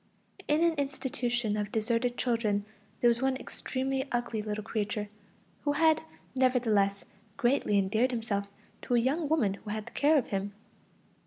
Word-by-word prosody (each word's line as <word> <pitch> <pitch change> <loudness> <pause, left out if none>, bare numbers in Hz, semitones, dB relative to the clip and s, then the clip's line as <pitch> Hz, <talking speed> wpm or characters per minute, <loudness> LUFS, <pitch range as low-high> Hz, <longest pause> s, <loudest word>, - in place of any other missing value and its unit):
In 300 +3 +3
an 335 -1 +4
institution 245 -5 -1
for 210 0 -1
deserted 230 +3 0
children, 220 -4 +1 0.4
there 240 - +5
was 235 +1 +3
one 265 0 +1
extremely 265 +1 -3
ugly 240 -2 -1
little 210 0 -3
creature, 210 -1 -2 0.5
who 290 - +1
had 315 +1 +4 0.3
nevertheless 225 -6 +2 0.3
greatly 240 -4 +2
endeared 215 +6 +2
himself 225 -5 -2 0.3
to 245 - 0
a - - +5
young 285 +6 0
woman 245 -12 +2
who 205 +2 -10
had 215 0 -3
the - - -10
care 300 +2 +4
of 265 - 0
him. 200 +1 -2
240 Hz, 155 wpm, -30 LUFS, 210-265 Hz, 0.5 s, there